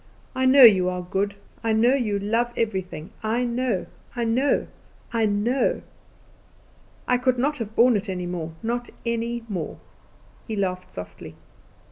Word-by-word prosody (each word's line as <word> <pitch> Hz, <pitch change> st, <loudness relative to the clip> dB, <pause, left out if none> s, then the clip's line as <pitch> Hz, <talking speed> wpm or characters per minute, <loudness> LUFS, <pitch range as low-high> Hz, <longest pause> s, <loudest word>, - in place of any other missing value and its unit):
I 260 Hz, 0 st, +1 dB
know 265 Hz, +1 st, +8 dB
you 190 Hz, -6 st, +8 dB
are 180 Hz, 0 st, -3 dB
good; 200 Hz, +2 st, -1 dB, 0.3 s
I 225 Hz, -1 st, +1 dB
know 235 Hz, +4 st, +4 dB
you 225 Hz, -7 st, 0 dB
love 230 Hz, +4 st, 0 dB
everything; 190 Hz, -6 st, -3 dB
I 225 Hz, +3 st, 0 dB
know, 240 Hz, -4 st, -1 dB, 0.3 s
I 240 Hz, -, -1 dB
know, 245 Hz, +5 st, +2 dB, 0.5 s
I 225 Hz, -2 st, +2 dB
know! 220 Hz, +6 st, +1 dB, 1.2 s
I 250 Hz, 0 st, +3 dB
could 255 Hz, 0 st, +2 dB
not 290 Hz, +4 st, 0 dB
have 220 Hz, -1 st, -5 dB
borne 240 Hz, 0 st, +5 dB
it 205 Hz, 0 st, -2 dB
any 180 Hz, -1 st, -3 dB
more, 170 Hz, -2 st, -4 dB
not 240 Hz, +1 st, -2 dB, 0.2 s
any 235 Hz, 0 st, -2 dB
more." 180 Hz, -8 st, -4 dB, 0.7 s
He 220 Hz, -, -3 dB
laughed 185 Hz, -2 st, -2 dB
softly. 90 Hz, 0 st, -9 dB
225 Hz, 150 wpm, -24 LUFS, 195-245 Hz, 1.2 s, know